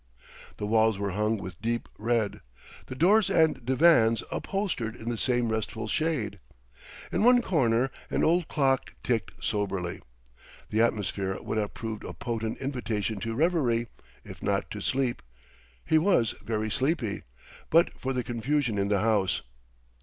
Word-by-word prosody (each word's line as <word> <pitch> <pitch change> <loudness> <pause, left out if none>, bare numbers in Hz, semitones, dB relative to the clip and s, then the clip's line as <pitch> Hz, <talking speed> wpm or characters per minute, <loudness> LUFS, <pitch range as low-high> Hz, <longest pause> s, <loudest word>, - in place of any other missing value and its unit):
The 105 - -3
walls 110 0 +3
were 100 -1 -2
hung 105 +3 0
with 95 -2 -8
deep 115 +1 -1
red, 110 -1 -1 0.5
the 130 - -6
doors 200 +8 +4
and 160 -8 +3
divans 125 -4 +4
upholstered 180 - -2
in 115 -1 -6
the 120 - -1
same 120 -2 +1
restful 110 0 -3
shade. 120 - -1 0.7
In - - +1
one 245 0 +6
corner 130 - +2 0.2
an - - 0
old 170 +1 +3
clock 135 -3 0
ticked 115 -6 0 0.2
soberly. 100 -4 -2 0.7
The 110 - +2
atmosphere 100 -4 0
would 110 - -2
have 105 -1 -3
proved 110 -2 -5
a - - -6
potent 115 -2 -3
invitation 115 -6 -2
to 115 +2 -3
reverie, 130 -7 +1 0.3
if - - -11
not - - -1
to - - -5
sleep 130 -2 0 0.6
he 160 - +4
was 155 - +3
very 110 -1 -2
sleepy 130 -5 0 0.5
but 165 +2 +5
for 130 - -2
the 125 -1 -1
confusion 120 -1 0
in 100 - +1
the 100 -2 +2
house. 105 -4 +1
115 Hz, 150 wpm, -28 LUFS, 110-135 Hz, 0.7 s, one